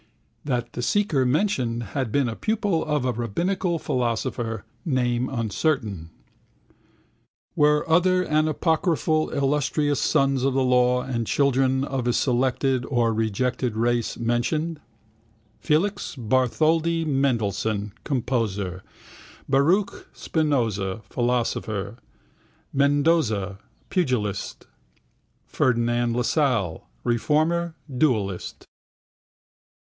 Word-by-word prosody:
That 120 -4 -2
the - - -4
seeker 160 - +1
mentioned 125 - 0
had 130 -5 -2
been 140 +1 +2
a 115 - -3
pupil 205 - 0
of 150 -4 -1
a 125 - +2
rabbinical 170 - -1
philosopher, 115 -4 -2 0.2
name 125 -5 0
uncertain. 110 - -1 1.5
Were 150 0 +3
other 180 +2 +3
anapocryphal 155 +1 +1
illustrious 145 +1 +1
sons 135 -1 +2
of 135 -1 +1
the 135 - +2
law 125 0 +3
and 115 -4 -3
children 135 -1 +2
of 135 -3 -2
a 120 - +2
selected 130 0 +1
or 120 -3 +1
rejected 115 +2 -1
race 120 0 0
mentioned? 135 +8 -1 0.8
Felix 195 +6 0
Bartholdy 155 +7 +1
Mendelssohn 110 -7 0
(composer), 105 -8 -2 0.7
Baruch 165 +9 +1
Spinoza 115 - -1
(philosopher), 115 -3 -1 0.7
Mendoza 140 - +2 0.3
(pugilist), 125 - -1 0.8
Ferdinand 120 -1 +1
Lassalle 125 - 0
(reformer, 160 +7 +1 0.2
duellist). 110 - -1
130 Hz, 90 wpm, -24 LUFS, 115-150 Hz, 1.5 s, Were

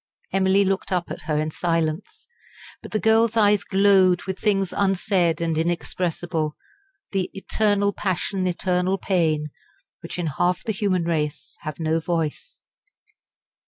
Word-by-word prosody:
Emily 195 +1 +3
looked 195 0 -1
up 180 -2 -1
at - - -6
her 150 -1 +1
in 155 +1 -1
silence. 165 - -2 0.6
But - - -9
the 215 - 0
girl's 225 +1 +3
eyes 205 -2 +4
glowed 190 -3 +4
with 190 -1 -5
things 195 -4 +1
unsaid 190 -4 +1
and 165 -1 0
inexpressible 165 -1 -2 0.6
the 190 -2 -1
"eternal 205 0 +1
passion, 190 0 -1
eternal 180 +1 0
pain," 160 -6 0 0.5
which - - -7
in 175 - -2
half 175 +4 0
the 220 - -1
human 195 -4 0
race 150 -3 -2
have 155 -2 -6
no 160 0 +1
voice. 160 -2 -3
180 Hz, 135 wpm, -23 LUFS, 165-195 Hz, 0.6 s, eyes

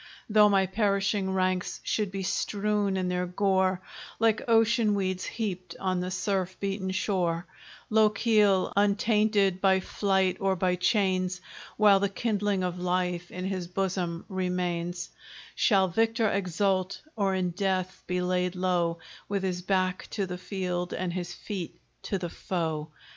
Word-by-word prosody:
Though 210 -1 +6
my 195 -1 +3
perishing 200 0 0
ranks 185 -1 0
should 210 -3 0
be 195 0 -4
strewed 200 +1 0
in 185 -1 -1
their 180 0 -1
gore, 190 0 +1 0.4
Like 225 -1 +2
ocean 225 -1 +4
weeds 185 -2 -1
heaped 185 -6 -4
on 185 -1 0
the 180 +1 -2
surf 185 -1 -2
beaten 195 -1 -2
shore, 180 -3 0 0.5
Lochiel, 210 -2 +3
untainted 205 -1 +2
by 190 -1 +4
flight 190 -1 +1
or 195 -1 +1
by 180 0 +1
chains, 185 -1 +1 0.4
While 205 -2 +6
the 200 0 +1
kindling 205 -2 0
of 180 0 -2
life 180 -1 -1
in 185 0 -5
his 185 -2 -3
bosom 180 -2 -2
remains, 180 -2 -2 0.4
Shall 195 -4 +3
victor 225 +4 +1
exult, 190 0 0 0.2
or 195 -3 +1
in 180 -1 0
death 185 0 -1
be 180 0 0
laid 180 0 0
low, 175 -2 +1 0.3
With 200 -1 -1
his 180 -1 -1
back 185 0 0
to 200 - +1
the 180 -1 -6
field, 180 -2 -3
and 180 -2 -2
his 175 -1 -4
feet 185 -1 -6 0.2
to 195 - -2
the 175 -2 -4
foe! 160 -4 -3
190 Hz, 145 wpm, -28 LUFS, 180-200 Hz, 0.5 s, Though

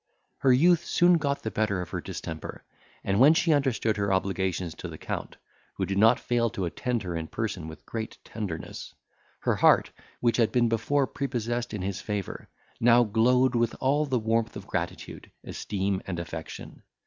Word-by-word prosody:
Her 130 - +4
youth 170 +6 +5
soon 175 0 +4
got 140 -1 -1
the 110 - -3
better 105 -3 0
of 90 -2 -6
her - - -3
distemper, 80 -1 -7 0.4
and 100 +1 +1
when 145 +6 +7
she 160 0 +3
understood 130 -6 +1
her 100 -1 0
obligations 95 -3 -1
to - - -4
the - - -8
Count, - - -5 0.4
who - - -1
did 95 0 -1
not 115 +3 +6
fail 120 -1 +1
to 105 -5 -3
attend 120 +6 -2
her 90 -2 -4
in 80 -1 -3
person 105 -7 -4
with 80 - -11
great 110 -1 -5
tenderness, 100 -8 -6 0.5
her - - +1
heart, - - +4 0.3
which 120 -1 +2
had 115 -3 +3
been 120 -2 +3
before 135 +5 +1
prepossessed 120 -4 -3
in 105 -4 -4
his 95 0 -3
favour, 105 -3 -5 0.3
now 120 +1 +6
glowed 125 +4 +3
with 120 -1 +1
all 145 +3 +2
the 130 -2 +1
warmth 115 0 0
of - - -7
gratitude, - - -5
esteem, 100 -1 -2
and 90 -3 -3
affection. 80 -1 -7
115 Hz, 180 wpm, -27 LUFS, 95-125 Hz, 0.5 s, when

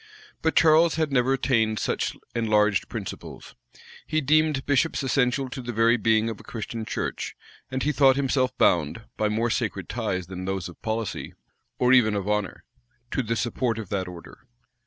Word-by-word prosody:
But 160 - +1
Charles 160 +1 +5
had 155 -2 0
never 130 -1 +2
attained 115 -4 +1
such - - -2 0.2
enlarged 105 -3 +2
principles. - - -7 0.5
He 155 - +1
deemed 155 -1 +2
bishops 145 +1 +1
essential 130 0 +1
to 130 - -5
the 120 0 -5
very 115 +1 +4
being 110 -1 +2
of 115 -2 -4
a - - -13
Christian 115 0 -6
church; - - -4 0.3
and 130 0 -2
he 150 - +2
thought 135 -1 +5
himself 135 -2 0
bound, 85 +6 +2
by 105 - 0
more 115 +2 0
sacred 100 -7 -2
ties 100 -6 -2
than 95 +1 -7
those 95 -2 -2
of 85 - -13
policy, 110 -1 -3 0.4
or 125 +1 +4
even 110 -5 +5
of 100 -1 -3
honor, 105 -2 -2 0.5
to - - 0
the 115 -1 -2
support 120 +1 -1
of 110 -5 -6
that 95 -2 -2
order. 90 -2 -12
115 Hz, 175 wpm, -25 LUFS, 105-135 Hz, 0.5 s, Charles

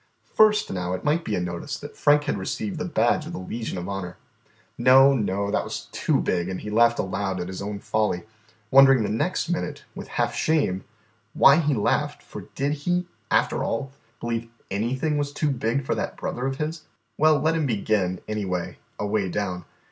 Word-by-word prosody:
First, 215 -1 +4
now, 90 -1 -2
it 95 - -4
might 155 +3 +1
be 105 - -2
a - - 0
notice 90 +11 -4
that 145 - -10
Frank 145 0 +4
had - - -1
received 100 +1 -3
the - - -2
badge - - +1
of - - -7
the - - -4
Legion 110 +2 -5
of 90 0 -5
Honour. 95 -3 -5 0.6
No, 130 +3 +6
no, 100 -4 -1
that - - +1
was - - -6
too - - +1
big, 90 0 0
and 95 - -4
he 105 - -6
laughed 115 +2 +4
aloud 95 -1 -2
at 90 - -3
his 95 +1 -6
own 100 +1 -4
folly, 105 -3 -1 0.5
wondering 135 -3 +7
the - - -1
next 145 - -1
minute, 175 0 -3
with - - -8
half - - -1
shame, 140 -13 +1 0.5
why 140 - +7
he 150 -4 +2
laughed, 105 - 0
for - - -9
did 140 +2 0
he, 175 +5 -1 0.2
after - - +2
all, 135 +4 -2 0.3
believe 115 -1 -3 0.2
anything 130 +9 0
was 145 0 -2
too 150 0 0
big 125 +1 -1
for - - 0
that - - -3
brother 125 +2 -3
of 135 0 -3
his? 155 +1 -4 0.3
Well, 155 -1 +4
let 160 +3 +2
him 160 -3 0
begin, 100 -5 0
anyway, 95 -5 -3 0.2
away 105 -2 -1
down. 90 -2 -3
115 Hz, 195 wpm, -25 LUFS, 95-145 Hz, 0.6 s, wondering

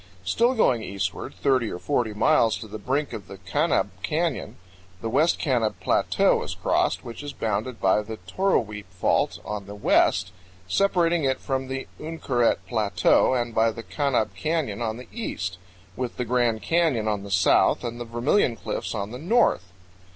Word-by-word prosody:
Still 235 - +2
going 125 - +3
eastward 100 -2 -4
30 130 -5 +3
or - - -5
40 115 -1 -1
miles 115 -2 +3
to 110 - -8
the 110 +1 -7
brink 140 +2 -1
of 100 - -7
the 100 - -9
Kanab 95 -1 0
Canyon, - - -1 0.4
the 115 - -4
West 160 +7 +3
Kanab 120 -7 +1
Plateau - - +2
is - - -5
crossed, - - 0
which 120 +3 -7
is 145 -1 -6
bounded 110 +3 -2
by 95 +2 +3
the 110 +1 -7
Toroweap 105 - -1
Fault 90 -2 +1
on 105 -2 -5
the 100 - -8
west, 100 - +2 0.4
separating 175 - +2
it 130 -1 +1
from 135 -1 -2
the 135 0 -4
Uinkaret 145 -7 0
Plateau, 110 +3 +3
and 120 -2 -1
by 115 +1 +3
the 115 +1 -6
Kanab 130 -9 0
Canyon 140 - -2
on 110 -1 -2
the 125 - -10
east, 90 - -4 0.4
with 125 -2 -4
the 125 - -1
Grand 120 -3 +1
Canyon 140 -4 +1
on 105 -2 0
the 100 - -9
south 95 -1 +3
and 120 0 -4
the - - -4
Vermilion 120 - +1
Cliffs - - -4
on 100 0 -3
the 125 - -7
north. 180 - +2
120 Hz, 175 wpm, -25 LUFS, 105-140 Hz, 0.4 s, going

